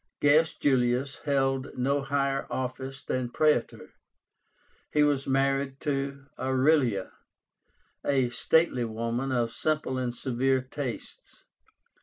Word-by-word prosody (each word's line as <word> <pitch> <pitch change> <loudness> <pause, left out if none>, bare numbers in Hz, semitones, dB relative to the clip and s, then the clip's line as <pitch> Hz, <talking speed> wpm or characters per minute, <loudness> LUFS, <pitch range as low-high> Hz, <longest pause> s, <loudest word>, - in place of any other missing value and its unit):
Gaius 150 +2 +4
Julius 130 0 +1
held 135 -1 0
no 140 +3 +1
higher 135 0 -1
office 130 +1 -4
than 130 -1 -2
Praetor. 150 -2 0 1.0
He 150 - +4
was 145 -2 +1
married 135 0 +1
to 140 -2 -2
Aurelia, 130 -5 +2 0.9
a 135 -3 +2
stately 145 0 +2
woman 115 +4 -2
of 120 -2 0
simple 150 -2 -1
and 120 -1 -2
severe 130 +1 +1
tastes. 130 -1 -7
135 Hz, 105 wpm, -28 LUFS, 125-140 Hz, 1.0 s, Gaius